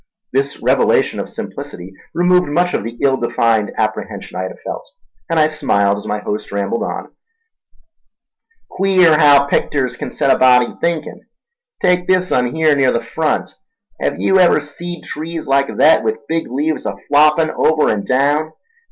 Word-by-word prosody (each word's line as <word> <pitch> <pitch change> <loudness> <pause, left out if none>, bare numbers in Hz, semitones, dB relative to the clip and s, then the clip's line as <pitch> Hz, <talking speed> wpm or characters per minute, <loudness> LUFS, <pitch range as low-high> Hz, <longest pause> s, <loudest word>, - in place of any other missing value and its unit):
This 140 +1 -1
revelation - - +1
of - - -5
simplicity 90 +2 -8 0.2
removed 180 0 +3
much 175 +5 0
of - - -1
the 115 +2 -7
ill 135 -1 +3
defined 115 -3 0
apprehension - - -4
I 95 - -3
had - - -8
felt, - - -6 0.4
and 165 -1 +1
I 155 - +5
smiled 100 -10 +1
as 100 - -8
my 105 - -1
host 105 0 -5
rambled 100 +3 -2
on: - - -5 1.6
"Queer 185 -5 +3
haow 145 -2 +5
picters 130 -3 -1
kin - - -4
set 135 - +1
a - - -6
body 125 -1 +4
thinkin'. 170 +2 -3 0.6
Take 180 0 +2
this 185 -1 +1
un 125 +1 0
here 155 -2 +3
near 135 -2 +2
the 115 - -2
front. 155 +6 -2 0.5
Hev - - -2
yew 190 0 +3
ever 175 -4 +5
seed 170 +4 -8
trees 160 +1 -6
like 140 0 +2
thet, 155 -6 +5
with 110 +5 -3
big 165 0 -2
leaves 150 +3 -2
a 100 - -3
floppin' 150 +2 +3
over 155 -1 +2
an' 105 -2 -2
daown? 145 +6 0
145 Hz, 165 wpm, -17 LUFS, 120-160 Hz, 1.6 s, I